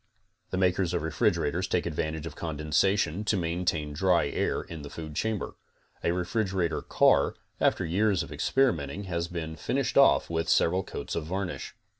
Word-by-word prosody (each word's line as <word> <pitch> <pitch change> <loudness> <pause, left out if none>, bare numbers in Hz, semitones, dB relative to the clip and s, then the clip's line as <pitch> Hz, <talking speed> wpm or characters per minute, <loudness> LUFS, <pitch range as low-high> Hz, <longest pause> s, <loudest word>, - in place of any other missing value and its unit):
The 95 - -2
makers 90 -1 +2
of 85 - -1
refrigerators 80 +2 +1
take 90 - 0
advantage 80 -1 -3
of 80 -3 -7
condensation 80 +4 0
te 105 -1 +1
maintain 85 -3 -1
dry 85 -1 +2
air - - -1
in 80 -2 -8
the 70 - -8
food 80 +1 -7
chamber. 110 +1 -2 0.5
A - - +2
refrigerator 90 -1 -1
car, - - +3 0.2
after 95 - +2
years 95 +2 +2
of - - -10
experimenting 100 - +1
has 85 -3 -2
been 80 -2 -5
finished - - 0
off - - +5
with 80 -1 -2
several 90 +3 +3
coats 70 - -6
of 80 - -2
varnish. 95 +1 -4
85 Hz, 160 wpm, -28 LUFS, 80-95 Hz, 0.5 s, off